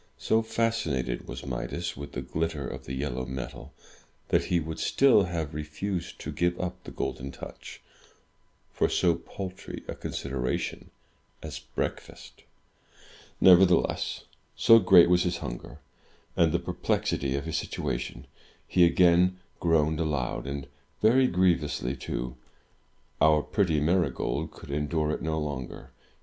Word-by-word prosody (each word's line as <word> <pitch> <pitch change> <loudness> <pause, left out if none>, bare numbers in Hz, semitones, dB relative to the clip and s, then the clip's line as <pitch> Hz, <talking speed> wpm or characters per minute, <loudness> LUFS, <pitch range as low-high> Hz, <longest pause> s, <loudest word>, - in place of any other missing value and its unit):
So 110 - +2
fascinated 110 - -1
was - - -7
Midas - - -4
with 70 +1 -8
the - - -4
glitter 80 -3 -2
of - - -7
the 65 - -5
yellow 65 -2 -3
metal, 65 0 -7 0.6
that - - +2
he 90 - +1
would 80 0 -5
still 130 -8 +4
have 80 -3 -3
refused 80 +5 -4
to - - -5
give 85 0 0
up 90 -1 -4
the - - -8
Golden 70 +1 -4
Touch 65 - -10 0.9
for - - +1
so - - +3
paltry 95 0 -7
a - - -3
consideration 65 -2 -3 0.5
as 75 -5 -6
breakfast. - - -6 1.0
Nevertheless, 90 -1 +4 0.3
so 115 0 +7
great 90 -3 +7
was 90 0 +4
his 90 -1 0
hunger, - - -7 0.6
and 85 -2 +4
the 85 - +2
perplexity 85 -6 -1
of 70 +2 -3
his 80 0 -2
situation, 65 -4 -4 0.4
he 90 - +4
again 90 +1 +4 0.2
groaned 80 -2 +2
aloud, 70 -5 -2
and 70 0 -4 0.4
very 130 +4 +5
grievously 85 - +1
too. 60 -1 -4 0.9
Our 75 -1 +5
pretty 90 -8 +1
Marygold 85 +4 0
could - - -11
endure 75 +1 0
it - - -3
no 80 0 -1
longer. 70 -5 -5
80 Hz, 135 wpm, -28 LUFS, 70-90 Hz, 1.0 s, so